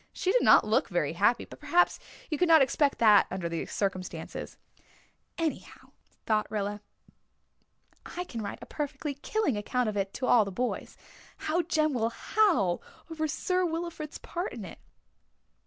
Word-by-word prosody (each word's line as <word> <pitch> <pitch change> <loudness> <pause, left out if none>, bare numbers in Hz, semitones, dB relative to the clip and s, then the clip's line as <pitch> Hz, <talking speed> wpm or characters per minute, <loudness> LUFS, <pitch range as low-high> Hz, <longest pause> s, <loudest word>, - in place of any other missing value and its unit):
She 370 - -1
did - - +3
not - - +6
look - - +1
very - - 0
happy, - - +2
but - - -13
perhaps 355 +1 +2 0.3
you 305 - -1
could 360 - +3
not 320 -4 +7
expect 280 +1 +1
that 215 -3 +6
under 185 -2 -3
the 170 -1 -3
circumstances." 190 -2 -4 0.8
"Anyhow," 325 -3 -4 0.3
thought 215 -1 +1
Rilla, 205 -1 -3 1.3
"I 355 - -5
can 235 -10 -6
write 205 - -5
a - - -8
perfectly 290 0 -4
killing 305 - -1
account 245 +4 -1
of 210 - -5
it 195 0 -2
all 245 -3 +5
to - - -7
the 200 - -5
boys. 245 +6 -3 0.4
How 325 +3 0
Jem 310 -3 +1
will 230 -2 +1
howl 240 - +2 0.3
over 315 -1 -1
Sir 365 +5 0
Wilfrid's 330 -2 -4
part 350 +2 -5
in 225 -5 -7
it!" - - -10
275 Hz, 160 wpm, -29 LUFS, 210-330 Hz, 1.3 s, not